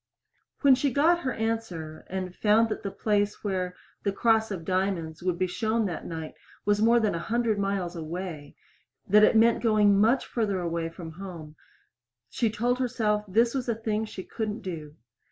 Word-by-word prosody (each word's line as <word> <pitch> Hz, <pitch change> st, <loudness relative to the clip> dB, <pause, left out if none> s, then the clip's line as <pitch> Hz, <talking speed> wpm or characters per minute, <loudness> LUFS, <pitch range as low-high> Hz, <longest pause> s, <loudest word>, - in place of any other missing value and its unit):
When 280 Hz, -2 st, +7 dB
she 265 Hz, +2 st, +1 dB
got 320 Hz, +7 st, +3 dB
her 260 Hz, -7 st, -2 dB
answer, 220 Hz, -9 st, -4 dB
and 185 Hz, -1 st, -4 dB
found 220 Hz, +2 st, +3 dB
that -, -, -3 dB
the 200 Hz, -, -3 dB
place 205 Hz, 0 st, 0 dB
where 185 Hz, -3 st, -2 dB, 0.3 s
"The 200 Hz, -, 0 dB
Cross 220 Hz, +2 st, +2 dB
of 180 Hz, -5 st, -5 dB
Diamonds" 185 Hz, -4 st, -1 dB
would 180 Hz, -1 st, -1 dB
be 185 Hz, -, +1 dB
shown 220 Hz, +5 st, 0 dB
that 180 Hz, -4 st, -4 dB
night 160 Hz, -2 st, -6 dB, 0.3 s
was 205 Hz, 0 st, +2 dB
more 230 Hz, +2 st, +5 dB
than 215 Hz, -3 st, +1 dB
a 170 Hz, -, -2 dB
hundred 225 Hz, +3 st, 0 dB
miles 195 Hz, -3 st, -1 dB
away 165 Hz, -2 st, -6 dB, 0.5 s
that 210 Hz, +2 st, +6 dB
it -, -, +5 dB
meant 230 Hz, +1 st, +4 dB
going 215 Hz, -3 st, +4 dB
that 200 Hz, -, +4 dB
much 230 Hz, +5 st, +3 dB
farther 205 Hz, -5 st, -1 dB
away 170 Hz, -1 st, -2 dB
from 165 Hz, -1 st, -9 dB
home 165 Hz, -3 st, -9 dB, 0.8 s
she 230 Hz, -, +1 dB
told 240 Hz, +4 st, 0 dB
herself 220 Hz, -4 st, 0 dB
this 230 Hz, +5 st, +2 dB
was 255 Hz, -3 st, -2 dB
a 230 Hz, -, +1 dB
thing 220 Hz, -1 st, -2 dB
she 190 Hz, -3 st, -8 dB
couldn't 215 Hz, +1 st, -4 dB
do. 155 Hz, -5 st, -7 dB
205 Hz, 185 wpm, -27 LUFS, 180-225 Hz, 0.8 s, When